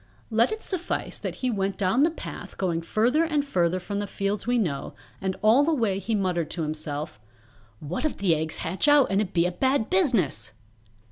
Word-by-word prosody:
Let 225 +2 +3
it 435 0 -4
suffice 365 -3 -3
that - - -4
he 250 - +2
went 195 -2 -1
down 195 +6 +2
that 325 +2 +3
path - - -8
going 170 -3 0
further 235 - +2
and 300 -3 0
further 180 -7 +1
from 200 +3 -4
the 205 - -3
fields 200 +2 -2
we 245 0 +2
know, 150 -11 -2 0.3
and 190 -1 -1
all 230 +6 +6
the 320 +1 +2
way 210 -7 0
he 220 +2 -1
muttered 180 -5 0
to 170 - -2
himself, 150 -6 -4 0.6
"What 155 - -4
if 310 - -1
the 190 -4 +2
eggs 160 0 -2
hatch 180 - -1
out 290 -6 +5
and 195 +1 +3
it 195 -3 -3
be 170 -1 +2
a 180 - +1
bad 260 +5 0
business!" 185 - +1
195 Hz, 205 wpm, -26 LUFS, 170-250 Hz, 0.6 s, all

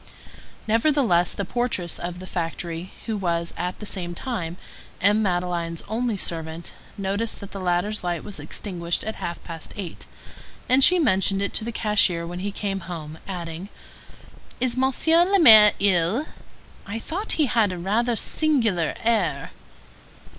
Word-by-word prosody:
Nevertheless, 225 - +3
the 200 - -3
portress 190 -5 -1
of 175 0 -5
the 185 - -8
factory, 170 0 -4
who 225 - -2
was, 170 -4 -1
at 180 +1 -3
the 210 - -8
same 175 -4 -3
time, 175 -8 -4 0.4
M. 210 +2 +3
Madeleine's 175 -3 -1
only 225 0 -1
servant, 165 -2 -4 0.3
noticed 200 +3 -1
that 200 - -9
the 200 - -6
latter's 185 +4 0
light 175 -3 -2
was 200 -6 -8
extinguished 170 +3 -3
at 220 - -5
half 170 0 -5
past 165 -2 -8
eight, 190 -5 -6 0.6
and 260 +2 +5
she 365 - +8
mentioned 195 - +2
it 200 - -2
to - - +1
the 235 - -3
cashier 205 -6 +2
when 175 +1 -6
he 200 +2 -3
came 195 -1 -3
home, 160 -2 -7
adding:— 175 0 -6 0.9
"Is 245 -1 +1
Monsieur 270 +6 +4
le 390 +3 +3
Maire 215 - +9
ill? 195 - +2 0.6
I 205 +3 -4
thought 365 - -3
he 310 - +2
had 225 -6 +2
a 180 - -5
rather 225 +7 0
singular 225 - +1
air." 195 -12 +1
195 Hz, 155 wpm, -24 LUFS, 175-225 Hz, 0.9 s, Maire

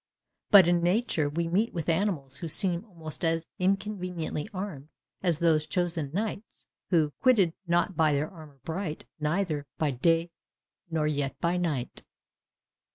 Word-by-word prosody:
But 195 -4 +9
in 175 0 +3
nature 175 -4 +1
we 165 +3 -1
meet 200 +6 +1
with 165 -3 -3
animals 160 -7 0
which 165 - -3
seem 175 +1 +2
almost 165 -7 -8
as 165 0 +1
inconveniently 185 -4 -1
armed 185 -8 -6 0.3
as 175 -4 +1
those 160 -2 +2
chosen 170 -4 -1
knights, 210 +4 -4 0.2
who... 155 -5 +2
quitted 205 -10 +4
not 175 +2 +2
their 150 -2 +3
armour 155 -5 -13
bright, 165 -1 -4
Neither 155 -2 -1
by 155 -2 +1
day 165 +6 +2 0.6
nor 160 -2 0
yet 145 -3 -1
by 170 +1 +1
night. 155 -8 -2
170 Hz, 140 wpm, -28 LUFS, 155-185 Hz, 0.6 s, But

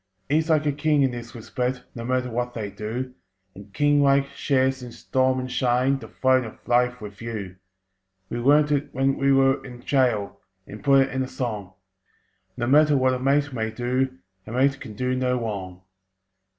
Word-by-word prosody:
He's 155 +3 +1
like 155 -1 +3
a 145 - +2
king 145 0 +2
in 135 - +2
this 120 0 -8
respect 125 +2 -3
(No 115 - -7
matter 125 0 -1
what 120 +1 -3
they 105 -3 -4
do), 120 +5 -5 0.4
And, 100 0 -13
king 145 +7 +3
like, 140 0 +4
shares 130 -2 0
in 125 -1 -8
storm 130 +2 0
and 130 0 -5
shine 125 +2 +1
The - - -10
Throne 130 -1 +2
of 110 - -11
Life 125 0 +2
with 100 0 -9
you. 105 -6 -6 0.7
We 120 - -4
learnt 145 +4 +4
it 145 0 0
when 135 +1 +1
we 140 0 +2
were 135 0 +3
in 125 -2 -10
gaol, 125 -7 +1 0.2
And 105 0 -11
put 135 +2 +5
it - - -9
in 130 - -1
a 130 - -2
song: 105 -8 -4 0.8
"No 120 - -1
matter 150 +3 +5
what 130 0 +3
a 125 - -2
mate 140 +2 +1
may 110 -2 -2
do, 125 -1 -1 0.3
A - - -7
mate 135 +3 +2
can 110 -5 -8
do 125 +3 -1
no 125 -1 0
wrong!" 95 -5 -5
130 Hz, 190 wpm, -24 LUFS, 115-135 Hz, 0.8 s, put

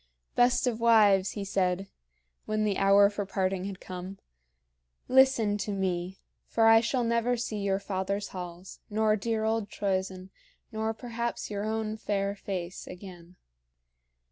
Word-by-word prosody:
"Best 245 +1 +3
of 235 -3 -1
wives," 205 -5 +5
he 205 -2 -4
said, 190 0 0 0.6
when 215 0 0
the 205 -2 0
hour 200 +1 +6
for 205 0 -3
parting 190 -1 -1
had 195 -1 -6
come, 185 +1 -7 0.9
"listen 255 -6 +4
to 210 - -3
me, 190 -1 -2 0.3
for 225 - +2
I 225 0 +7
shall 245 +2 0
never 235 +1 +1
see 225 -2 -3
your 195 -1 0
father's 200 +1 -3
halls, 180 0 -8
nor 215 0 +2
dear 220 +1 -1
old 220 -2 0
Troezen, 190 -2 -3 0.4
nor 220 0 -1
perhaps 235 -1 -4
your 205 0 -3
own 220 0 -2
fair 200 -2 -1
face, 185 -3 -5
again. 180 -1 -11
200 Hz, 145 wpm, -28 LUFS, 190-220 Hz, 0.9 s, I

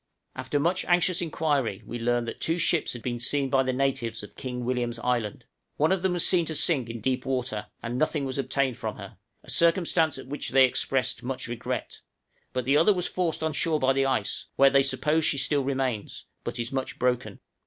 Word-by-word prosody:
} - - -55
After 145 - -2
much 175 +5 +1
anxious 175 0 +3
inquiry 145 - -1
we 120 - -5
learned 120 0 0
that - - -6
two 165 +1 0
ships 170 -1 +1
had 120 - -9
been 120 -1 -2
seen 135 +2 +2
by 135 - +4
the 130 -1 0
natives 125 -4 -1
of 105 - -11
King 125 -2 -5
William's 120 -1 -1
Island; 115 -3 -2 0.3
one 155 +4 +3
of 190 -2 +1
them 190 -1 +1
was 175 - +3
seen 180 -2 +4
to 160 - -3
sink 145 -6 +2
in 115 -1 -6
deep 130 +2 0
water, 125 -5 -2 0.2
and 120 +2 -3
nothing 155 -2 0
was 130 +1 -3
obtained 135 -2 0
from - - -4
her, - - -10 0.2
a - - -8
circumstance 170 -2 +3
at - - -8
which 145 +3 -5
they 135 0 +6
expressed 130 -1 -1
much 130 0 -4
regret; 120 -1 -4 0.5
but 125 -2 -2
the 140 +3 +4
other 165 +7 +5
was 180 -1 0
forced 170 -3 -1
on 160 -1 0
shore 155 0 +1
by 130 0 +3
the 135 0 +2
ice, 110 -6 -1
where 135 0 +6
they 140 - +5
suppose 150 +3 +1
she 150 - +2
still 140 0 +1
remains, 130 -5 -2 0.2
but - - -4
is 115 -1 -3
much 135 -1 -3
broken. 125 0 -1
135 Hz, 215 wpm, -27 LUFS, 125-155 Hz, 0.5 s, they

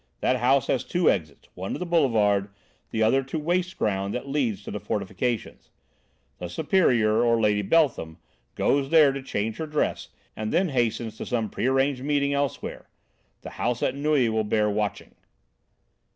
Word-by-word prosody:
That 130 - +1
house 130 +2 +3
has 130 - 0
two 175 -1 +2
exits; 75 -7 -5
one 95 +2 -5
to - - -3
the 180 - -4
Boulevard, 110 - +2 0.4
the 110 - 0
other 130 +5 +3
to 135 +4 -5
waste 175 +4 -1
ground 100 -1 -1
that 125 +3 -5
leads 125 -8 -1
to - - -7
the 105 - -4
fortifications. 110 +3 -3 0.7
The 90 - -5
Superior, 120 - +2
or 115 -1 +3
Lady 105 -2 +2
Beltham, 105 - +1 0.4
goes 140 -1 +1
there 155 -3 +6
to 135 0 -5
change 110 -4 -3
her 160 - -4
dress, 150 0 -2 0.3
and 110 0 -4
then 185 0 +2
hastens 115 -4 -1
to - - -4
some 115 -4 -1
prearranged 135 +1 +1
meeting 140 -1 +1
elsewhere. 140 -1 -3 0.5
The - - -8
house 120 0 0
at - - +1
Neuilly 140 -3 +1
will 110 0 0
bear 105 0 +1
watching." 105 0 -3
125 Hz, 165 wpm, -25 LUFS, 105-140 Hz, 0.7 s, there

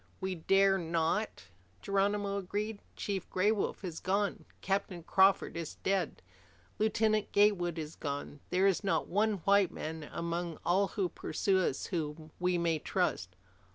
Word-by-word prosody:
"We 190 0 -2
dare 195 +3 +3
not," 165 - -1 0.3
Geronimo 200 0 +1
agreed. 205 +3 -3 0.2
"Chief 195 -3 -3
Gray 195 +3 +2
Wolf 210 -2 -2
is 170 -4 -5
gone. 200 +2 -1
Captain 195 -3 -2
Crawford 190 +2 +3
is 165 -2 -5
dead. 195 - 0 0.6
Lieutenant 215 0 +2
Gatewood 190 -5 +3
is 155 -1 -6
gone. 145 0 -4
There 185 +2 +2
is 195 +1 +3
not 195 - +1
one 215 +3 +2
white 200 -2 +5
man 160 -1 -6
among 170 0 -3
all 190 +3 +3
who 195 -3 -1
pursue 190 +3 0
us 185 - 0
whom 155 -3 -4
we 180 0 +2
may 165 -2 +1
trust. 90 - -1
190 Hz, 145 wpm, -32 LUFS, 170-200 Hz, 0.6 s, white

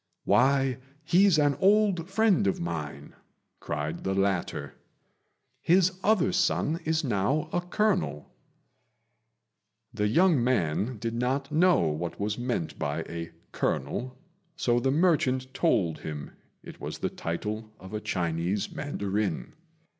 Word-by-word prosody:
"Why, 135 0 +3 0.2
he's 180 +2 +4
an 145 -2 +3
old 195 -3 +3
friend 200 - +3
of 95 - 0
mine," 75 -4 -5 0.5
cried 75 +3 -4
the 95 0 -1
latter; 95 -8 -1 0.9
"his 185 +1 +3
other 210 -4 +3
son 170 -2 +1
is 160 0 +1
now 130 +5 0
a 175 - +1
colonel." 175 - -1 1.6
The 105 -2 0
young 160 - +4
man 110 0 0
did 115 +2 -3
not 130 +4 -1
know 180 +3 +4
what 80 +1 -2
was 105 +1 -1
meant 120 -10 -3
by 75 +3 -2
a 85 0 -6 0.2
colonel, 120 - -2 0.4
so 120 -7 +1
the 130 - +1
merchant 130 -5 +2
told 90 - +1
him 75 -2 -6 0.3
it - - -11
was - - -5
the - - -2
title 105 +6 -4
of 95 +3 -11
a 105 - -3
Chinese 85 +2 -1
mandarin. 100 - -3
120 Hz, 125 wpm, -28 LUFS, -, 1.6 s, he's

